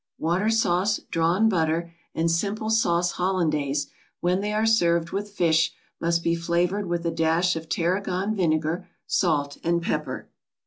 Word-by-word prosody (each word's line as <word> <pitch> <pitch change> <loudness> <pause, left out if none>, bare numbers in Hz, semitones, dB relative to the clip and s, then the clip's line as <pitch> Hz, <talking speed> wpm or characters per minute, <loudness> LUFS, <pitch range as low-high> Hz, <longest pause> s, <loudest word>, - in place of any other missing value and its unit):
Water 175 +7 +1
sauce, 210 -2 +2
drawn 170 +6 +2
butter 170 -3 0 0.2
and 165 +1 +1
simple 210 +5 -1
sauce 175 -5 +2
Hollandaise, 155 -6 0 0.3
when 180 +2 +1
they 210 +1 -2
are 215 +1 +1
served 170 -7 +2
with 205 +1 -3
fish, 165 -5 +2 0.3
must 170 0 0
be 170 - +2
flavored 175 +4 0
with 170 0 -2
a 170 - +1
dash 165 +2 +2
of 160 0 -6
tarragon 185 +4 0
vinegar, 165 -1 0 0.2
salt 145 -5 0
and 170 0 +2
pepper. 170 +6 -3
170 Hz, 145 wpm, -25 LUFS, 165-195 Hz, 0.3 s, sauce